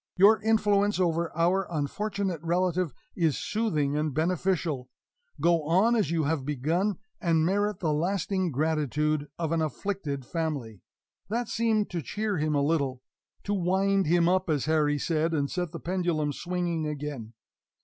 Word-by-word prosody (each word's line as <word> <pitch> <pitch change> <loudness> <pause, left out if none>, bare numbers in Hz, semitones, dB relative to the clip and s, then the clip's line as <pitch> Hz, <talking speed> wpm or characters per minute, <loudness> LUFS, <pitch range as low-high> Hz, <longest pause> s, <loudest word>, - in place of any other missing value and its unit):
Your 205 +3 +6
influence 210 -2 +2
over 170 -2 +1
our 180 +3 +2
unfortunate 185 +3 -2
relative 175 0 0 0.2
is 165 -5 +1
soothing 155 -11 0
and 150 -2 -1
beneficial. 160 -5 0 0.5
Go 170 +2 +3
on 190 +9 +3
as 215 -4 +1
you 165 -1 +1
have 150 -1 0
begun 160 +8 0 0.2
and 165 -4 +2
merit 205 +2 0
the 155 -4 +1
lasting 185 +3 0
gratitude 150 0 0
of 165 -2 -2
an 165 -1 +1
afflicted 155 -4 -3
family." 140 - -3 0.5
That 235 +1 -1
seemed 220 -2 +1
to 175 -2 -2
cheer 205 - -2
him 155 0 0
a 140 - +2
little 140 -4 0 0.4
to 205 - -1
wind 195 0 +2
him 170 +1 +4
up, 185 0 +2
as 150 -4 +1
Harry 150 -2 +2
said, 160 +2 0
and 140 -2 -1
set 175 -3 -2
the 170 - -6
pendulum 170 -5 -1
swinging 175 -1 -2
again. 145 -6 -5
170 Hz, 150 wpm, -28 LUFS, 150-190 Hz, 0.5 s, Your